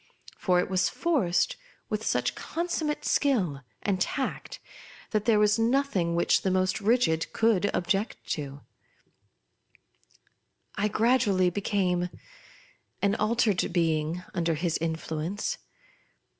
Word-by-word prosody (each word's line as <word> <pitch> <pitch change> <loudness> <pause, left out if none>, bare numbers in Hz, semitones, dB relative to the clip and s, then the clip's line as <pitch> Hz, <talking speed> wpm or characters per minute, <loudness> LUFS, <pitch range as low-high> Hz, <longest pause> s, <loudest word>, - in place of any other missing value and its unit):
For 180 -2 +2
it - - 0
was 185 0 +1
forced 315 - +1 0.3
with - - -3
such - - 0
consummate 325 -3 -3
skill 190 - +1 0.2
and 190 -2 0
tact, 280 - -2 0.5
that 215 -1 0
there 225 -2 +4
was 210 +1 +3
nothing 225 -8 +1
which 170 - +3
the 190 - 0
most 185 +2 +1
rigid 200 -7 +2
could 220 -3 +2
object 195 +5 -1
to. 140 -2 -6 2.1
I 210 - 0
gradually 210 -5 +2
became 180 -2 0 0.9
an 200 0 +3
altered 215 -3 +1
being 165 0 0
under 170 -2 0
his 165 +1 -1
influence. 165 - -3
195 Hz, 110 wpm, -28 LUFS, 175-230 Hz, 2.1 s, there